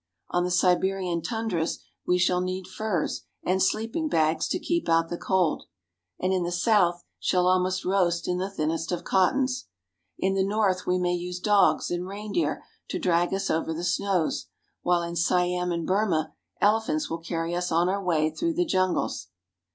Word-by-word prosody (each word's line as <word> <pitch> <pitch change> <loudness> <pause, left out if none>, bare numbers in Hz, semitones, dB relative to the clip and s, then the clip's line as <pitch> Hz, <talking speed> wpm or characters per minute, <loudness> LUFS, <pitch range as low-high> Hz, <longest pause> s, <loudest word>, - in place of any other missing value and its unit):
On 175 - +2
the 180 - -1
Siberian 180 -1 +1
tundras 180 -3 -2 0.3
we 180 - +3
shall 180 0 +2
need 185 0 -3
furs 210 -7 -2 0.2
and 190 +1 +1
sleeping 225 - 0
bags 160 - +2
to - - 0
keep 340 - -1
out 165 0 +3
the - - -2
cold; 185 -5 +1 0.5
and 185 +1 +1
in 185 - +1
the 175 0 -2
south 175 -2 +2 0.2
shall 180 -1 +2
almost 185 +1 +2
roast 175 -3 +1
in 180 0 0
the 190 +2 -2
thinnest 165 -2 -2
of 175 - -2
cottons. 255 +7 +1 0.5
In 190 0 +1
the 195 0 +2
north 195 -2 0
we 180 - +2
may 180 -1 +1
use 180 0 -4
dogs 195 -7 +3
and 175 +1 -2
reindeer 210 - -2 0.2
to - - -3
drag 175 -1 +1
us 195 0 -1
over 160 0 -1
the 170 - -4
snows; 180 -1 0 0.3
while 175 -1 +2
in 170 0 -5
Siam 180 +1 +1
and 170 -1 -2
Burma, 185 -5 +1 0.3
elephants 205 -7 +2
will 165 - -4
carry 165 0 -3
us 175 0 -2
on 170 +2 +3
our 195 +2 -1
way 160 -3 +1
through 330 - -2
the 355 - +2
jungles. 185 - 0
180 Hz, 175 wpm, -26 LUFS, 170-195 Hz, 0.5 s, we